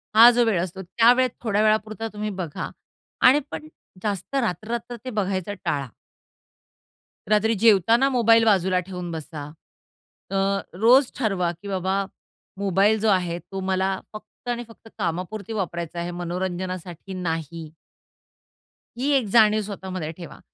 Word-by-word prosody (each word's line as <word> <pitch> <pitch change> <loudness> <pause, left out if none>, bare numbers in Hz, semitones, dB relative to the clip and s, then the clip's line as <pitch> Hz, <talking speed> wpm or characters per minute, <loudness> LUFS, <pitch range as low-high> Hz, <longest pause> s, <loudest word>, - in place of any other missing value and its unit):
हा 230 +2 +10
जो 240 0 +3
वेळ 205 -7 +2
असतो 185 +1 -5
त्यावेळेत 240 +7 +4
थोड्या 210 -3 +1
वेळापुरता 215 +1 +1
तुम्ही 210 0 -3
बघा 155 -4 -5 0.6
आणि 270 +3 +6
पण 310 - -6 0.4
जास्त 205 +4 -3
रात्र-रात्र 235 0 -2
ते - - -3
बघायचा 200 -3 -2
टाळा. 140 -2 -1 1.4
रात्री 215 +1 +3
जेवताना 225 +4 +5
मोबाईल 230 -3 +4
बाजूला 190 -3 +3
ठेवून 180 -2 -5
बसा. 155 -2 -6 0.9
अ, - - -2 0.4
रोज 240 +8 +5
ठरवा, 195 -7 0
की 175 +4 -12
बाबा 190 0 -1 0.5
मोबाईल 200 +2 +3
जो 220 - 0
आहे, 180 -3 +1
तो 195 +3 -8
मला 190 0 0
फक्त 215 +3 -13
आणि 240 0 -2
फक्त 225 0 -16
कामापुरती 185 +4 -3
वापरायचा 170 -4 -3
आहे, 170 +1 -3
मनोरंजनासाठी 180 +1 -4
नाही. 165 -3 -4 1.3
ही 270 +4 0
एक 255 - 0
जाणीव 215 -2 +6
स्वतःमध्ये 190 -5 -5
ठेवा. 170 -3 -10
195 Hz, 130 wpm, -24 LUFS, 180-225 Hz, 1.4 s, हा